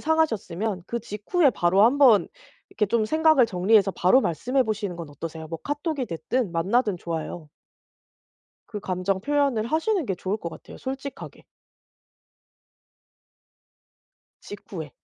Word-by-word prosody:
상하셨으면 220 - 0
그 235 - -3
직후에 235 - +1
바로 185 -2 +2
한번 250 -4 +5 0.4
이렇게 210 - -1
좀 220 +1 +1
생각을 315 -3 +4
정리해서 195 +1 +3
바로 185 +10 +4
말씀해 250 - 0
보시는 205 -5 -3
건 170 -3 -7
어떠세요? 160 +2 -7
뭐 165 +1 -6
카톡이 290 -1 -2
됐든 175 - -2
만나든 200 +4 +1
좋아요. 165 -1 -5 1.2
그 210 - -5
감정 185 0 -1
표현을 275 -3 +1
하시는 325 - 0
게 190 - -1
좋을 190 +3 -3
것 170 - -6
같아요 - - -12
솔직하게. 270 +1 -7 3.0
직후에. 170 -7 -8
210 Hz, 285 characters per minute, -25 LUFS, 180-265 Hz, 3.0 s, 한번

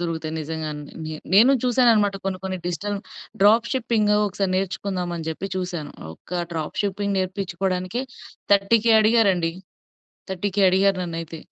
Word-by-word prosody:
దొరుకుతాయి 165 -2 -3
నిజంగానే. 155 -1 -5 0.2
నే 155 - -5 0.2
నేను 245 +7 +7
చూసానన్నమాట 230 -5 +3
కొన్ని 185 -1 -2
కొన్ని 190 -1 -3
డిజిటల్ 200 +4 -2 0.4
డ్రాప్ 220 +3 +5
షిప్పింగ్ 225 -5 +1
ఒకసారి 195 -1 -2
నేర్చుకుందామని 180 -3 -3
జెప్పి 190 +5 -4
చూసాను 175 -5 -4 0.2
ఒక 175 - -5
డ్రాప్ 160 -2 -4
షిప్పింగ్ 200 0 -1
నేర్పించుకోవడానికే, 185 +3 -2 0.5
30,000 220 +3 +4
అడిగారండి. 200 -7 +3 0.8
30,000 195 +2 -1
అడిగారు 195 0 +3
నన్నైతే. 165 -1 -5
190 Hz, 120 wpm, -23 LUFS, 175-205 Hz, 0.8 s, నేను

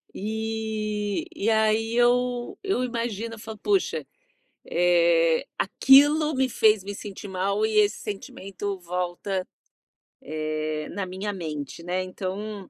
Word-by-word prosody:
e 215 - -2
e 210 - -2
aí 220 +1 +2
eu 245 0 +2
eu 385 -10 0
imagino, 230 -2 -3
falo: 220 0 -9
"Poxa, 395 -2 +1 0.6
eh, 170 -2 +3
aquilo 290 +8 +5
me 265 0 +2
fez 215 -4 +3
me 200 +1 -5
sentir 205 0 -8
mal 200 +3 0
e 220 0 -1
esse 205 0 +3
sentimento 195 -1 -5
volta, 180 +2 -3 0.7
eh, 155 0 -3
na 200 -2 -3
minha 190 +3 -4
mente", 155 -5 -5
né. 180 +2 -1
Então 195 +2 -5
205 Hz, 120 wpm, -25 LUFS, 185-225 Hz, 0.7 s, aquilo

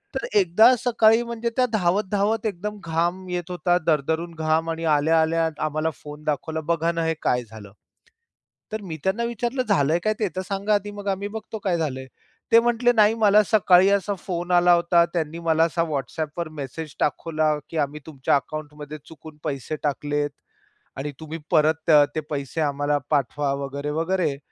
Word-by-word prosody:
तर 265 - -2
एकदा 215 +8 +5
सकाळी 225 -1 +4
म्हणजे 235 0 -3
त्या 255 - +3
धावत-धावत 205 +3 +1
एकदम 210 +1 -4
घाम 170 +3 -1
येत 180 0 -4
होता, 175 0 +1
दरदरून 160 +3 0
घाम 160 +1 0
आणि 165 0 -3
आल्या-आल्या 160 +2 +2 0.2
आम्हाला 155 +1 -1
फोन 150 0 -10
दाखवला. 155 +2 -2
बघा 165 +1 0
ना, 165 -1 -2
हे 165 - +1
काय 125 0 +1
झालं? 105 -3 -12 1.0
तर 215 -1 -4
मी 160 -1 -5
त्यांना 205 +5 0
विचारलं 240 +2 -2
झालंय 150 +4 +3
काय 215 - +2
ते 210 - +1
तर 185 - -1
सांगा 200 +2 0
आधी? 205 +1 -2
मग 205 0 -8
आम्ही 195 +1 -2
बघतो 220 0 -7
काय 185 -4 0
झालंय? 130 -5 -3 0.4
ते 230 - +8
म्हंटले 240 +1 +2
नाही 215 0 +5
मला 210 -1 +5
सकाळी 190 -3 +5
असा 200 0 +1
फोन 175 -1 -4
आला 175 0 +5
होता. 170 0 +4
त्यांनी 165 0 -2
मला 165 -1 +2
असा 165 0 +1
WhatsAppवर 155 +3 -3
मेसेज 150 +3 -6
दाखवला 155 0 0
की 165 - -5
आम्ही 150 0 -1
तुमच्या 145 -3 0
अकाउंटमध्ये 150 +1 -5
चुकून 155 0 -13
पैसे 140 +2 -3
टाकलेत 145 0 -1 0.7
आणि 145 +2 -4
तुम्ही 160 +1 -6
परत 155 +1 +2 0.3
ते - - +1
पैसे 145 +2 -3
आम्हाला 145 0 0
पाठवा 145 0 0
वगैरे, 140 +2 -5
वगैरे 165 -2 0
165 Hz, 165 wpm, -23 LUFS, 150-200 Hz, 1.0 s, ते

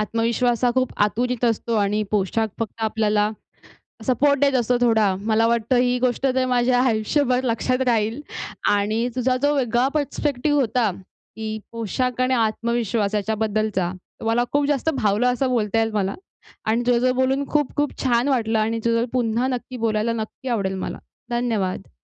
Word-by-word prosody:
आत्मविश्वास 235 +2 0
हा 245 - +4
खूप 255 -1 +1
आतुरीत 245 +3 -2
असतो 230 0 0
आणि 210 +1 +1
पोशाख 215 +2 0
फक्त 225 0 -5
आपल्याला, 215 -1 +1 0.8
सपोर्ट 280 +2 +3
देत 280 -1 +3
असतो 245 +1 +1
थोडा. 220 -5 +3
मला 225 +1 +3
वाटतं 235 +1 +1
ही 250 0 +2
गोष्ट 250 0 0
तर 260 0 +1
माझ्या 245 0 +2
आयुष्यभर 250 +2 +1
लक्षात 255 +2 0
राहील 225 +1 +1 0.5
आणि 215 +4 +1
तुझा 255 0 +1
जो 290 +1 +3
वेगळा 245 -1 +2
परस्पेक्टिव्ह 290 -1 0
होता, 235 -3 +1 0.5
की 220 0 -4 0.2
पोशाख 235 +3 -2
आणि 255 +1 +2
आत्मविश्वास 230 -2 0
याच्याबद्दलचा. 215 -3 -1 0.3
मला 230 +2 +2
खूप 285 0 +2
जास्त 290 +2 +1
भावलं 215 -2 +1
असं 260 +2 0
बोलता 225 -3 0
येईल 225 0 +1
मला. 200 -2 -1 0.5
आणि 225 +2 +1
तुझ्यासोबत 250 +1 +3
बोलून 265 +2 +1
खूप-खूप 295 0 0
छान 245 0 +2
वाटलं 225 -5 +1
आणि 225 +1 0
तुझ्यासोबत 230 +1 +1
पुन्हा 240 -1 0
नक्की 255 0 -4
बोलायला, 225 -1 0
नक्की 230 +3 -5
आवडेल 200 -5 -1
मला. - - -5 0.3
धन्यवाद. 220 -6 -2
235 Hz, 150 wpm, -22 LUFS, 220-255 Hz, 0.8 s, हा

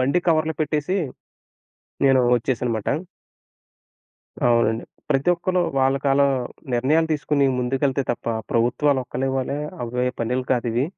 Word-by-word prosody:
బండి 140 +7 +2
కవర్లో 160 -1 +2
పెట్టేసి 155 +4 -1 1.1
నేను 135 -1 +5 0.2
వచ్చేసానన్నమాట. 120 -3 -1 1.6
అవునండి. 115 -1 +2 0.3
ప్రతి 135 +2 +2
ఒక్కళ్ళు 180 +1 0 0.2
వాళ్ళకలా 135 +1 +3 0.5
నిర్ణయాలు 150 +7 +2
తీసుకొని 145 -2 +1
ముందుకెళ్తే 135 +2 0
తప్ప, - - -10 0.2
ప్రభుత్వాలు 130 +4 +2
ఒక్కలే 135 +2 -2
వల్లే 135 +2 -2 0.3
అవ్వే 125 +1 -1
పనులు 125 +2 -1
కాదువి. 120 0 0
135 Hz, 105 wpm, -23 LUFS, 125-145 Hz, 1.6 s, నేను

